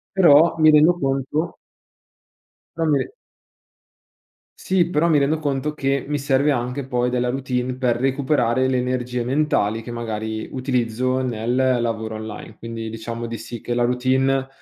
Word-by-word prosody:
però, 165 Hz, -3 st, +6 dB
mi 155 Hz, 0 st, +6 dB
rendo 155 Hz, +3 st, +6 dB
conto 135 Hz, +4 st, -1 dB, 1.2 s
però 165 Hz, -1 st, 0 dB
mi 145 Hz, -, +4 dB
re -, -, -14 dB, 1.5 s
Sì, 185 Hz, -2 st, +1 dB
però 170 Hz, 0 st, +1 dB
mi 155 Hz, -, +4 dB
rendo 145 Hz, +3 st, +1 dB
conto 145 Hz, 0 st, -2 dB
che 135 Hz, -2 st, -1 dB
mi 145 Hz, 0 st, -1 dB
serve 140 Hz, +1 st, +2 dB
anche 125 Hz, +1 st, -2 dB
poi 125 Hz, -1 st, 0 dB
della 125 Hz, 0 st, 0 dB
routine 125 Hz, -1 st, -2 dB
per 125 Hz, -2 st, +1 dB
recuperare 130 Hz, -1 st, +1 dB
le 130 Hz, -1 st, +1 dB
energie 125 Hz, -1 st, -2 dB
mentali 120 Hz, -5 st, 0 dB
che 115 Hz, -, -10 dB
magari 110 Hz, -1 st, -4 dB
utilizzo 130 Hz, -1 st, -1 dB
nel 120 Hz, -1 st, -2 dB, 0.3 s
lavoro 110 Hz, -1 st, -3 dB
online. 110 Hz, 0 st, -8 dB
Quindi 115 Hz, -1 st, -6 dB
diciamo 115 Hz, +1 st, -5 dB
di 115 Hz, 0 st, -5 dB
sì, 115 Hz, 0 st, -8 dB
che 120 Hz, -, -3 dB
la 120 Hz, -, +1 dB
routine 130 Hz, +2 st, +1 dB
130 Hz, 150 wpm, -22 LUFS, 120-140 Hz, 1.5 s, però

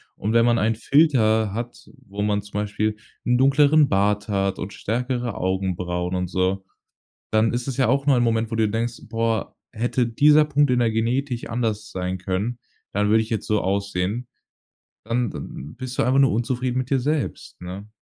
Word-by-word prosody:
Und 105 Hz, +2 st, -2 dB
wenn 115 Hz, 0 st, +5 dB
man 120 Hz, -1 st, +3 dB
einen 110 Hz, +1 st, +1 dB
Filter 110 Hz, -5 st, +3 dB
hat, 120 Hz, +2 st, -6 dB, 0.2 s
wo 100 Hz, +1 st, -5 dB
man 105 Hz, 0 st, +1 dB
zum 105 Hz, -, -15 dB
Beispiel 105 Hz, +1 st, -1 dB, 0.3 s
'n 120 Hz, 0 st, +3 dB
dunkleren 140 Hz, +2 st, +5 dB
Bart 105 Hz, +2 st, +1 dB
hat 100 Hz, -1 st, 0 dB
und 90 Hz, -, -5 dB
stärkere 120 Hz, +1 st, -2 dB
Augenbrauen 90 Hz, -1 st, -2 dB
und 90 Hz, 0 st, -1 dB
so, 95 Hz, +2 st, 0 dB, 0.7 s
dann 110 Hz, +1 st, +2 dB
ist 120 Hz, +1 st, -2 dB
es 135 Hz, -, -4 dB
ja 130 Hz, -3 st, +3 dB
auch 135 Hz, +3 st, +1 dB
nur 140 Hz, -3 st, +4 dB
ein 120 Hz, -, +3 dB
Moment, 115 Hz, 0 st, 0 dB
wo -, -, -1 dB
du 110 Hz, -1 st, +2 dB
denkst: 115 Hz, +2 st, -3 dB
„Boah, 115 Hz, -2 st, -1 dB, 0.2 s
hätte 120 Hz, +2 st, 0 dB
dieser 150 Hz, +6 st, +5 dB
Punkt 145 Hz, -1 st, +2 dB
in 125 Hz, -, +2 dB
der 115 Hz, -2 st, +2 dB
Genetik 120 Hz, +3 st, -1 dB
anders 110 Hz, -3 st, -2 dB
sein 90 Hz, 0 st, -3 dB
können, 100 Hz, +6 st, -2 dB, 0.3 s
dann 105 Hz, +1 st, +1 dB
würde 110 Hz, +1 st, +4 dB
ich 110 Hz, -, -11 dB
jetzt 110 Hz, -3 st, -3 dB
so 105 Hz, -1 st, +1 dB
aussehen.“ 100 Hz, +4 st, -2 dB, 0.8 s
Dann 115 Hz, +1 st, -1 dB
dann 75 Hz, +3 st, -8 dB
bist 130 Hz, 0 st, -6 dB
du -, -, +4 dB
einfach 130 Hz, +3 st, +3 dB
nur 135 Hz, -1 st, +5 dB
unzufrieden 125 Hz, +3 st, -1 dB
mit 130 Hz, 0 st, -3 dB
dir 135 Hz, -, +3 dB
selbst, 145 Hz, +3 st, -3 dB
ne? 95 Hz, +3 st, -7 dB
115 Hz, 190 wpm, -23 LUFS, 100-125 Hz, 0.8 s, wenn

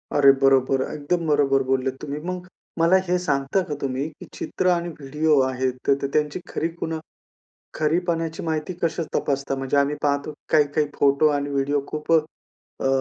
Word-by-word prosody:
अरे 140 Hz, -1 st, +7 dB
बरोबर! 135 Hz, -1 st, +4 dB
एकदम 165 Hz, +4 st, -1 dB
बरोबर 140 Hz, -2 st, +3 dB
बोललेत 130 Hz, 0 st, +1 dB
तुम्ही. 145 Hz, 0 st, -4 dB
मग 180 Hz, 0 st, -4 dB, 0.3 s
मला 165 Hz, +3 st, +5 dB
हे 180 Hz, +1 st, +2 dB
सांगता 140 Hz, +1 st, 0 dB
का 150 Hz, -, -2 dB
तुम्ही 135 Hz, +1 st, -2 dB
की 155 Hz, -, -13 dB
चित्र 185 Hz, -, -2 dB
आणि 175 Hz, -1 st, +1 dB
व्हिडिओ 150 Hz, +2 st, +2 dB
आहेत 130 Hz, 0 st, -1 dB
तर 140 Hz, 0 st, +2 dB
त्यांची 150 Hz, +3 st, 0 dB
खरी 165 Hz, -, -1 dB
खूण 160 Hz, -, -2 dB, 0.8 s
खरी 155 Hz, +2 st, +1 dB
पणाची 165 Hz, -1 st, -2 dB
माहिती 160 Hz, +2 st, -2 dB
कशी 165 Hz, 0 st, 0 dB
तपासता? 140 Hz, -1 st, -1 dB
म्हणजे 135 Hz, +1 st, -1 dB
आम्ही 140 Hz, +1 st, +2 dB
पाहतो 145 Hz, +1 st, 0 dB, 0.2 s
काही-काही 150 Hz, -1 st, +3 dB
फोटो 140 Hz, +2 st, +4 dB
आणि 145 Hz, 0 st, -3 dB
व्हिडिओ 140 Hz, +1 st, 0 dB
खूप 155 Hz, +1 st, -4 dB
अ, 155 Hz, -3 st, -3 dB
145 Hz, 160 wpm, -23 LUFS, 135-160 Hz, 0.8 s, अरे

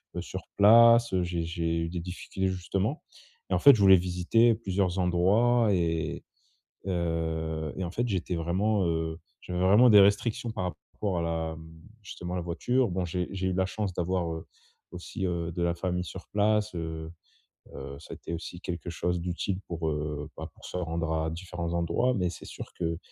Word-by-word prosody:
heu, -, -, -2 dB
sur -, -, -7 dB
place 115 Hz, +1 st, +7 dB
j'ai 85 Hz, -1 st, -2 dB
j'ai 85 Hz, 0 st, -1 dB
eu 85 Hz, -, -2 dB
des 85 Hz, 0 st, -4 dB
difficultés 90 Hz, +2 st, -3 dB
justement. 95 Hz, -, -2 dB, 0.5 s
Et -, -, +2 dB
en -, -, +1 dB
fait 140 Hz, -2 st, +8 dB
je 105 Hz, -, -1 dB
voulais 95 Hz, -1 st, +8 dB
visiter 90 Hz, +6 st, +3 dB
plusieurs 95 Hz, -4 st, -1 dB
endroits 105 Hz, +7 st, +3 dB
et 80 Hz, -4 st, -1 dB, 0.6 s
heu 80 Hz, -3 st, -2 dB
et 95 Hz, -, -2 dB
en 85 Hz, -, -4 dB
fait, 120 Hz, +4 st, -1 dB
j'étais 95 Hz, -3 st, -2 dB
vraiment, 95 Hz, +4 st, +1 dB
heu, 80 Hz, 0 st, -2 dB, 0.2 s
j'avais 90 Hz, 0 st, -4 dB
vraiment 105 Hz, +7 st, +6 dB
des 105 Hz, -2 st, +9 dB
restrictions 100 Hz, +4 st, +2 dB
par 95 Hz, -, -3 dB, 0.3 s
rapport 95 Hz, -4 st, -2 dB
à -, -, -1 dB
la, 80 Hz, -1 st, -2 dB
hem, 80 Hz, 0 st, -12 dB, 0.3 s
justement 90 Hz, -2 st, -6 dB
la -, -, -1 dB
voiture. 120 Hz, +8 st, 0 dB
Bon, 90 Hz, +1 st, -1 dB
j'ai 90 Hz, +1 st, -2 dB
j'ai 95 Hz, -1 st, -2 dB
eu -, -, 0 dB
de -, -, -2 dB
la 95 Hz, -, +2 dB
chance 100 Hz, -1 st, -3 dB
d'avoir, 90 Hz, -1 st, -1 dB
heu, 80 Hz, 0 st, -7 dB, 0.5 s
aussi, 90 Hz, +2 st, -6 dB
heu, 85 Hz, -2 st, -2 dB
de 85 Hz, -, -3 dB
la 85 Hz, 0 st, +1 dB
famille 90 Hz, 0 st, -2 dB
sur 80 Hz, -, -9 dB
place, 105 Hz, 0 st, +1 dB
heu 80 Hz, -1 st, -5 dB, 0.7 s
heu, 70 Hz, +1 st, -7 dB
ça -, -, -13 dB
a -, -, -6 dB
été -, -, -7 dB
aussi 85 Hz, +1 st, -6 dB
quelque 90 Hz, -1 st, -5 dB
chose 90 Hz, +1 st, -1 dB
d'utile 90 Hz, +2 st, -2 dB
pour, 85 Hz, -2 st, -3 dB
heu, 75 Hz, 0 st, -3 dB
bah, -, -, -6 dB
pour -, -, -15 dB
se -, -, -8 dB
rendre 85 Hz, -2 st, -2 dB
à 80 Hz, 0 st, 0 dB
différents 85 Hz, -1 st, -5 dB
endroits, 85 Hz, +10 st, +1 dB
mais 90 Hz, -3 st, 0 dB
c'est -, -, -10 dB
sûr -, -, -9 dB
que, 85 Hz, -2 st, -1 dB
90 Hz, 195 wpm, -28 LUFS, 85-100 Hz, 0.7 s, des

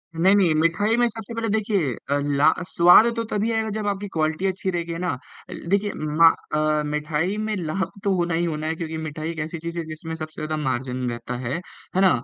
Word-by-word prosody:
नहीं, 185 Hz, +5 st, +5 dB
नहीं, 185 Hz, -6 st, +4 dB
मिठाई 185 Hz, +7 st, +2 dB
में 240 Hz, 0 st, +4 dB
सबसे 225 Hz, -1 st, -7 dB
पहले 230 Hz, 0 st, -2 dB
देखिए 205 Hz, -, +1 dB, 0.2 s
अ, 145 Hz, 0 st, +2 dB, 0.2 s
ला 145 Hz, -, +6 dB, 0.2 s
स्वाद 175 Hz, +7 st, +7 dB
तो 230 Hz, -, -1 dB
तभी 210 Hz, +2 st, 0 dB
आएगा 220 Hz, -1 st, 0 dB
जब 210 Hz, 0 st, -3 dB
आपकी 205 Hz, 0 st, -2 dB
क्वालिटी 160 Hz, +3 st, 0 dB
अच्छी 190 Hz, 0 st, -2 dB
रहेगी, 170 Hz, -1 st, -3 dB
है 165 Hz, -, -5 dB
ना? 180 Hz, 0 st, -1 dB, 0.4 s
अ, -, -, -6 dB, 0.2 s
देखिए 200 Hz, +2 st, +2 dB
मा 155 Hz, +2 st, +4 dB, 0.3 s
अ, 155 Hz, 0 st, +2 dB
मिठाई 150 Hz, +5 st, -1 dB
में 215 Hz, 0 st, -1 dB
लाभ 185 Hz, +1 st, -2 dB
तो 200 Hz, -, +2 dB
होना 175 Hz, -1 st, 0 dB
ही 170 Hz, +1 st, +1 dB
होना 155 Hz, -2 st, -2 dB
है, 160 Hz, -, -1 dB
क्योंकि 160 Hz, -1 st, -4 dB
मिठाई 155 Hz, 0 st, -4 dB
एक 165 Hz, -, -7 dB
ऐसी 155 Hz, +2 st, -3 dB
चीज़ 170 Hz, +1 st, -6 dB
है, -, -, -2 dB
जिसमें 160 Hz, +1 st, -6 dB
सबसे 155 Hz, -1 st, -7 dB
ज़्यादा 155 Hz, 0 st, -2 dB
मार्जिन 130 Hz, -1 st, -2 dB
रहता 120 Hz, +1 st, -5 dB
है, 120 Hz, -, -1 dB, 0.4 s
है 190 Hz, -, +3 dB
ना? 190 Hz, -, +7 dB
170 Hz, 225 wpm, -23 LUFS, 155-200 Hz, 0.4 s, स्वाद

